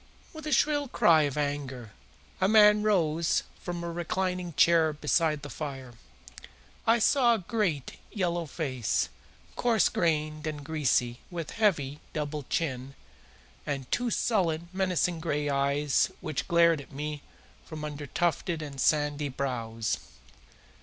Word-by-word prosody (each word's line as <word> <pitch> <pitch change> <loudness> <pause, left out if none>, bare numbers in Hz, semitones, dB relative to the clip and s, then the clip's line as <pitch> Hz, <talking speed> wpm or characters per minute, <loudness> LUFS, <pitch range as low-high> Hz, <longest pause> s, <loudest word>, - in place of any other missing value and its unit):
With 315 -1 -8
a - - -2
shrill 290 0 +2
cry 170 -10 +4
of 140 - -8
anger 140 -6 -3 0.5
a 190 - +3
man 210 0 +6
rose 170 -6 +2 0.2
from 175 -1 -5
a 170 - -3
reclining 180 +1 -2
chair 165 -1 +4
beside 150 0 +1
the - - -5
fire. 135 -5 -6 0.9
I 230 +1 +6
saw 240 +1 +4
a 190 -6 -6
great 185 - -1
yellow 175 -4 -1
face, 130 -7 -1 0.5
coarse 230 -6 +3
grained 155 -2 -1
and 150 -2 -5
greasy, 130 -6 0
with 170 -3 -5
heavy, 155 -11 +1
double 150 -2 -4
chin, 135 -4 -2 0.7
and 135 -3 -4
two 245 0 +1
sullen, 170 -8 0
menacing 180 -3 0
gray 150 -3 -1
eyes 140 +1 +2
which 155 -4 -4
glared 170 -2 +4
at - - -15
me 150 +1 -5 0.4
from 155 -1 -7
under 145 -1 -6
tufted 170 +1 -1
and 140 -3 -6
sandy 145 -1 +1
brows. 115 -4 -2
155 Hz, 135 wpm, -28 LUFS, 145-180 Hz, 0.9 s, man